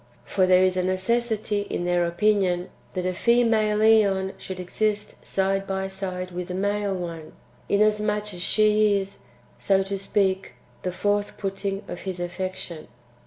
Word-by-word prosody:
For 185 -2 +2
there 185 0 +6
is 185 -1 +2
a 185 - +1
necessity 210 +2 0
in 175 - -2
their 175 -1 +2
opinion, 185 -1 +1 0.2
that 180 -1 -2
a 185 - 0
female 225 0 +3
^on 205 -3 +4
should 190 -1 -7
exist 210 +3 -2
side 195 0 0
by 190 0 -2
side 185 -1 -4
with 180 0 -5
a 180 - -3
male 200 0 0
one, 170 -3 -6 0.4
inasmuch 210 0 +1
as 175 - -7
she 210 +1 +3
is, 195 0 -7 0.4
so 195 -1 +2
to 195 0 -4
speak, 195 -1 0 0.3
[the 185 - -2
forth 205 +2 -1
putting 195 0 -3
of] - - -6
his 185 -2 -5
affection. 175 -2 -5
195 Hz, 155 wpm, -25 LUFS, 185-210 Hz, 0.4 s, there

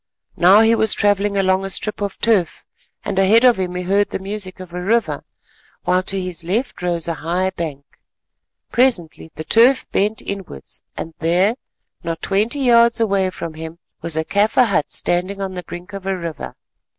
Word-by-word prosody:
Now 190 +5 +6
he 225 +1 +4
was 220 -2 +3
travelling 205 0 +1
along 190 0 +2
a 195 - -3
strip 210 +2 -1
of 200 -1 -3
turf 210 -7 0 0.4
and 195 -2 -1
ahead 210 +5 +5
of 245 -4 +5
him 180 -1 -3
he 180 - -3
heard 200 +3 +1
the - - -3
music 195 -1 -5
of 180 -2 -10
a 180 - -4
river, 225 +5 0 0.6
while 180 0 +2
to 195 +1 +1
his 180 -2 -4
left 210 +9 -2
rose 170 -2 0
a 170 - -1
high 175 +4 -1
bank. 155 -6 -6 0.9
Presently 230 -11 +1
the 155 - -5
turf 235 - +4
bent 210 +3 0
inwards 195 - -6 0.2
and 165 - -6
there, 180 +6 +2 0.5
not 165 -1 -4
twenty 215 +8 0
yards 235 -2 +4
away 200 -4 +1
from 170 -3 -7
him, 160 +1 -8 0.2
was 165 -2 -3
a 160 - 0
Kaffir 210 +7 +3
hut 155 -7 0
standing 185 +3 -1
on 195 -1 -4
the 180 - -5
brink 175 +3 -10
of 195 -1 -7
a 190 -1 -1
river. 170 -5 -6
190 Hz, 185 wpm, -19 LUFS, 175-210 Hz, 0.9 s, Now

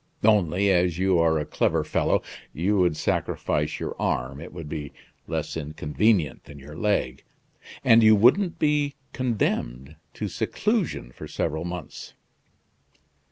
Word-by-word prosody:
Only, 100 -2 +3
as 90 -2 +2
you 95 -1 +2
are 80 -1 +3
a 75 - -2
clever - - 0
fellow, - - +1 0.3
you 95 +6 +1
would 90 -4 +2
sacrifice - - -1
your - - -4
arm; 70 +3 -1
it 85 - -9
would 85 -3 -8
be 75 -2 -6 0.3
less - - -3
inconvenient 75 +3 0
than 70 0 -12
your 70 +2 -11
leg; 80 -9 -1 0.6
and 115 +1 +6
you 110 -1 +7
wouldn't 165 - +4
be 150 -1 +1 0.2
condemned 75 - -2 0.2
to - - -3
seclusion 200 - -1
for - - -10
several 80 +3 -2
months." 90 -2 -7
90 Hz, 135 wpm, -25 LUFS, 75-110 Hz, 0.6 s, you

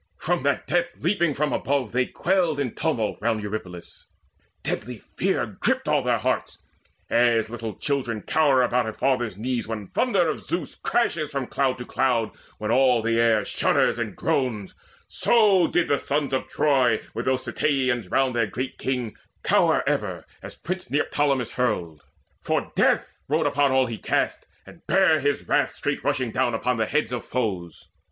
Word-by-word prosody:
From 175 -1 -1
that 140 +1 0
death 175 0 0
leaping 170 -4 +1
from 150 +1 0
above 140 -1 -1
they 125 +1 +1
quailed 175 -5 0
In 130 -5 -2
tumult 135 -9 -1
round 110 -1 0
Eurypylus: 95 -4 -7 0.6
deadly 120 +2 -3
fear - - -1
Gripped - - 0
all - - +3
their - - +1
hearts. - - -2 0.5
As 115 -2 +3
little 115 -2 -5
children 125 -7 -2
cower 140 -4 +3
About 125 -1 +1
a - - -6
father's 120 -7 0
knees 120 +1 -2
when 110 -2 -4
thunder 195 - +1
of - - -2
Zeus 170 -5 -4
Crashes 160 -11 0
from 140 -3 -3
cloud 130 0 0
to 125 - -7
cloud, 125 -4 0 0.3
when 105 +1 -2
all 125 -2 +4
the 115 0 +1
air 115 -3 +3
Shudders - - +1
and - - -3
groans, 115 -8 -1 0.3
so 205 -6 +4
did 175 - +1
the 140 - +2
sons 140 -1 -1
of 130 - -1
Troy, 130 -6 +2
With 115 - -4
those 130 0 0
Ceteians 130 -8 0
round 130 +1 +1
their 115 -2 +2
great 130 +5 -5
king, 125 -4 -2 0.3
cower - - +3
Ever - - -1 0.2
as - - -9
prince 185 -5 -5
Neoptolemus 140 -2 0
hurled; 90 - -1 0.4
for - - -1
death - - +1
Rode 155 +3 +1
upon 145 -1 +2
all 130 0 +3
he 115 -3 -5
cast, - - -1 0.2
and 170 - -15
bare 185 -5 +4
his 145 0 -1
wrath - - +2
Straight - - -3
rushing 130 -3 0
down 125 -1 0
upon 125 +2 0
the 110 -1 0
heads 150 -6 0
of 125 - -3
foes. 95 -9 -3
130 Hz, 170 wpm, -24 LUFS, 115-145 Hz, 0.6 s, all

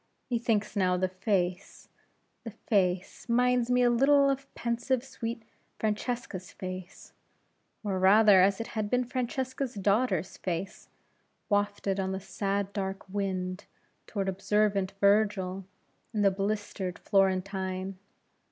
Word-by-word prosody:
Methinks 225 -3 0
now 185 -2 +2
the 185 +1 +1
face 185 -1 -2 0.6
the 230 - -5
face 195 -2 -1
minds 245 0 +3
me 250 0 +4
a 245 - +5
little 275 +3 +5
of 275 0 -5
pensive, 240 +2 -1
sweet 230 -3 -5 0.3
Francesca's 215 -3 -3
face 185 0 -8 0.7
or, 195 -3 -1
rather, 200 0 +7
as 195 +1 +3
it 230 - -4
had 215 -2 -2
been 250 +2 +2
Francesca's 260 +1 -3
daughter's 200 -3 +1
face 180 +1 -4 0.6
wafted 205 -1 0
on 190 0 -1
the 190 - -3
sad 200 0 -2
dark 195 -1 -4
wind, 185 -1 -3 0.4
toward 200 -3 -2
observant 195 0 +1
Virgil 200 -2 +2 0.5
and 210 -2 +1
the 195 - +6
blistered 195 -2 -3
Florentine. 190 -1 0
200 Hz, 120 wpm, -29 LUFS, 190-230 Hz, 0.7 s, rather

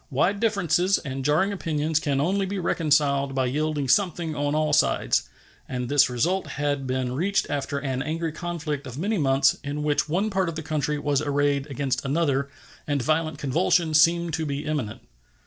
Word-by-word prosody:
Wide 175 +9 +1
differences 195 -4 +2
and 135 -3 -5
jarring 155 +8 +2
opinions 155 -4 -1
can 140 -3 -1
only 190 +6 +1
be 200 +1 -3
reconciled 145 -5 +1
by 130 -1 +1
yielding 145 +2 -1
something 170 +1 +1
on 145 0 -1
all 155 0 +1
sides, - - +2 0.4
and 125 -2 -3
this 145 -2 +4
result 170 +11 0
had 145 -2 -2
been 130 -1 -1
reached 185 +10 0
after 140 -1 -2
an 135 -2 -2
angry 160 +2 -2
conflict 155 -4 -4
of 125 0 -8
many 200 +5 -1
months, 135 -1 +3
in 145 +1 -3
which 150 0 0
one 195 +7 0
part 190 -3 0
of 165 - -6
the 160 - -5
country 150 -1 -1
was 145 -1 0
arrayed 145 -1 0
against 135 -1 -2
another, 140 -1 0 0.4
and 145 -4 0
violent 155 +2 0
convulsion 160 +3 +1
seemed 170 +1 +4
to 160 - -1
be 140 +1 -3
imminent. 145 -8 -3
150 Hz, 180 wpm, -25 LUFS, 140-165 Hz, 0.4 s, this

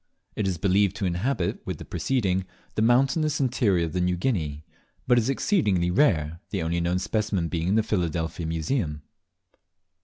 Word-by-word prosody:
It 105 - -1
is 90 -2 -1
believed 100 +2 +2
to 105 -3 -2
inhabit, 90 +2 -1
with - - -4
the - - -9
preceding, 95 -8 0 0.3
the - - -1
mountainous, 135 +6 +3
interior 115 -10 +2
of 80 - -6
New 90 0 +1
Guinea, 80 - -2 0.4
but 120 -1 +4
is 115 +2 -1
exceedingly 105 - +1
rare, 85 - +2
the - - -2
only 85 +1 0
known 85 +1 +1
specimen 95 -2 -1
being 85 0 -2
in 100 - +2
the 110 - +3
Philadelphia 85 -5 -2
Museum. 80 - -2
95 Hz, 160 wpm, -26 LUFS, 85-115 Hz, 0.4 s, but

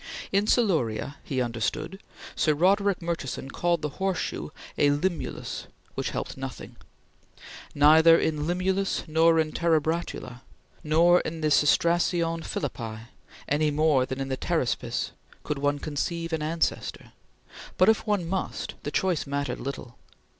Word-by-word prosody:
In 200 +2 +2
Siluria, 145 - +1
he 130 -2 -1
understood, 135 - -3 0.3
Sir 155 -2 +2
Roderick 195 +3 +2
Murchison 140 -5 -4
called 170 -2 0
the 150 +5 -5
horseshoe 190 -5 -2 0.3
a 145 - +4
Limulus, 160 +4 -2 0.3
which - - -2
helped - - -4
nothing. - - -7 1.0
Neither 160 +3 +7
in 160 -2 0
the - - -3
Limulus 185 +4 0
nor 165 +1 +4
in 155 -1 +1
the - - -5
Terebratula, 160 -6 -1 0.4
nor 170 +3 +5
in 160 0 -5
the 155 -1 +1
Cestracion 170 +2 +2
Philippi, 115 -4 -5 0.4
any 150 +2 +2
more 145 -3 +2
than 130 +1 -4
in 135 0 -3
the 130 - -2
Pteraspis, - - -1 0.3
could 150 - -3
one 145 +1 +1
conceive 165 +3 -3
an 160 - -1
ancestor, 160 +2 -2 0.7
but, - - +5
if 220 +1 +3
one 205 -5 +1
must, 190 +2 -3
the - - -4
choice 175 -1 0
mattered 140 0 -2
little. 130 -3 -7
160 Hz, 140 wpm, -26 LUFS, 145-175 Hz, 1.0 s, Neither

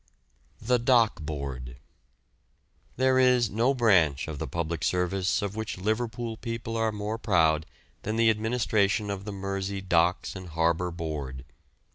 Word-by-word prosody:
THE 125 +2 +1
DOCK 115 -6 +3
BOARD. 70 -5 -5 1.2
There 130 +1 +3
is 125 -4 +4
no 120 +6 +2
branch 90 - +3
of 75 -3 -6
the - - -3
public 80 +2 -3
service 90 +2 0
of 100 0 -3
which 110 -2 -4
Liverpool 110 +3 -2
people 115 -1 -5
are 115 -1 +1
more 105 +1 -4
proud 80 -7 +2 0.3
than 110 +2 -3
the 115 0 +5
administration 105 -2 +1
of 100 0 -5
the 105 - -4
Mersey 100 0 -3
Docks 90 -1 +1
and 95 -2 -8
Harbour 85 +2 +1
Board. 75 -6 -5
100 Hz, 140 wpm, -27 LUFS, 85-115 Hz, 1.2 s, the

